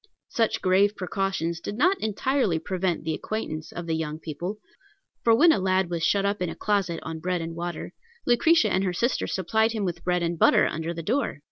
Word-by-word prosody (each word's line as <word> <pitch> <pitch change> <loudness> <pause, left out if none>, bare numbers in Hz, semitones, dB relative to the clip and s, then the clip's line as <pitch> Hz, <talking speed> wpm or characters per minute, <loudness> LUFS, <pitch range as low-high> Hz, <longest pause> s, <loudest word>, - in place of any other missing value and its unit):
Such 225 -2 0
grave 195 +2 +3
precautions 185 -3 -2
did 205 +5 -6
not 365 +8 +3
entirely 220 - +1
prevent 180 0 -2
the 160 0 -1
acquaintance 160 -8 -4
of 175 - -6
the 165 - -1
young 155 -1 -3
people; 170 +6 -5 0.7
for 230 -1 +5
when 325 +8 +6
a 215 - +2
lad 185 -1 +1
was 170 -1 -2
shut 195 +5 +2
up 200 -1 -1
in 180 - 0
a - - -6
closet, 195 -5 0
on 160 0 -5
bread 180 +2 -1
and 165 0 -5
water, 175 +1 -5 0.3
Lucretia 245 0 +4
and 190 - +2
her 185 -2 0
sister 235 +8 0
supplied 220 +5 +1
him 215 -3 -2
with 175 -2 -4
bread 180 -1 +1
and 170 -1 -2
butter - - +5
under 160 +1 -2
the 165 -1 -5
door. 250 - -1
185 Hz, 210 wpm, -26 LUFS, 165-215 Hz, 0.7 s, when